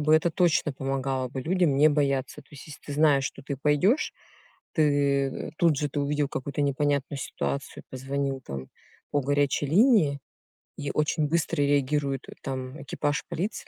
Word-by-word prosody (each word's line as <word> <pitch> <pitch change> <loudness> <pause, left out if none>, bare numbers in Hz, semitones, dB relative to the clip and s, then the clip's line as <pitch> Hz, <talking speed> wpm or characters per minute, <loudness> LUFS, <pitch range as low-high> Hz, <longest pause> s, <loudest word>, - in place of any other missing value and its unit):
бы 155 +1 +4
это 160 +2 +3
точно 165 -4 +2
помогало 135 -1 -2
бы 130 +1 -5
людям 170 -1 +1
не 150 +2 +6
бояться. 140 -3 0
То - - -31
есть, 140 -2 -12
если 150 - -11
ты 145 - -5
знаешь, 145 -2 +3
что - - -5
ты 140 0 -4
пойдешь, 150 - +2 0.6
ты, 160 - +2 0.7
э, - - -7
тут 165 -4 +4
же 145 +1 -1
ты 145 +1 -3
увидел 145 0 0
какую-то 140 +2 -4
непонятную 140 0 0
ситуацию, 140 +1 -4
позвонил, 135 +1 -3
там, 65 -1 -6 0.4
по 145 - +1
горячей 145 +1 +1
линии 170 - +4 0.6
и 140 - -3
очень 150 0 +1
быстро 155 -2 0
реагирует, 140 -1 +1
э, - - -8
там, 130 +1 -5
экипаж 145 +1 -2
полиции, 195 +7 -3
145 Hz, 165 wpm, -27 LUFS, 135-150 Hz, 0.7 s, не